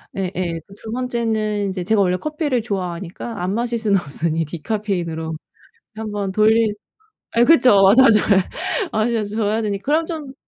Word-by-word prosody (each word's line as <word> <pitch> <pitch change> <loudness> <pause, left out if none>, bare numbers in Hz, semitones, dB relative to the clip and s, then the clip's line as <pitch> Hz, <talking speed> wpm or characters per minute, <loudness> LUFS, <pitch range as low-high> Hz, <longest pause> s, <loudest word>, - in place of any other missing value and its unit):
예예. 180 -3 -3 0.2
2 220 - -7
번째는 225 -4 -1
인제 185 -1 -3
제가 210 +2 +2
원래 180 -2 +2
커피를 300 - -1
좋아하니까 190 0 -5
안 185 +2 -1
마실 235 +1 -1
수는 205 -4 +2
없으니 160 +1 -2
디카페인으로 170 -2 -3 0.6
1 220 -1 -5
번 200 -2 -3
돌린 215 +1 +3 0.6
아 235 - +3
그쵸. 210 -10 +6
자주. 255 -5 +6
예. 200 -2 +3 0.5
아 215 0 +1
자주 215 -3 -2
줘야 220 0 0
되니. 205 -2 -1
그럼 305 +7 +1
좀 310 -5 -6
210 Hz, 300 characters per minute, -20 LUFS, 185-230 Hz, 0.6 s, 그쵸